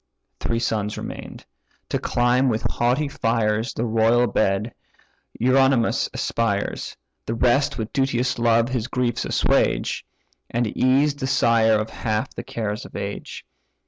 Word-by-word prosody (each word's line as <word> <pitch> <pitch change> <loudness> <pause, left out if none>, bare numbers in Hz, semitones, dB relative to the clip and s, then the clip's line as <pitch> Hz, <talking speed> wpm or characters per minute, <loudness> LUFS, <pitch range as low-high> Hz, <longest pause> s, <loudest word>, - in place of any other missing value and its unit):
Three 115 - -1
sons 110 -2 -1
remain'd; - - -8 0.4
to - - 0
climb 125 +2 +2
with 110 -2 -1
haughty 125 +5 0
fires 115 -3 0
The 115 - -1
royal 115 +2 +3
bed, 105 0 0 0.7
Eurynomus 130 -1 +3
aspires; 100 -3 -2 0.3
The 115 - -1
rest 125 +4 +2
with 110 -2 -4
duteous 125 -2 0
love 115 0 +3
his 125 -3 -2
griefs 125 -3 -1
assuage, - - +1 0.5
And 120 +1 0
ease 135 +3 +3
the 140 -2 -4
sire 115 -4 +3
of 110 +1 -4
half 110 -1 -2
the - - -5
cares 110 -1 -4
of - - -12
age. 100 0 -6
115 Hz, 135 wpm, -23 LUFS, 110-125 Hz, 0.7 s, royal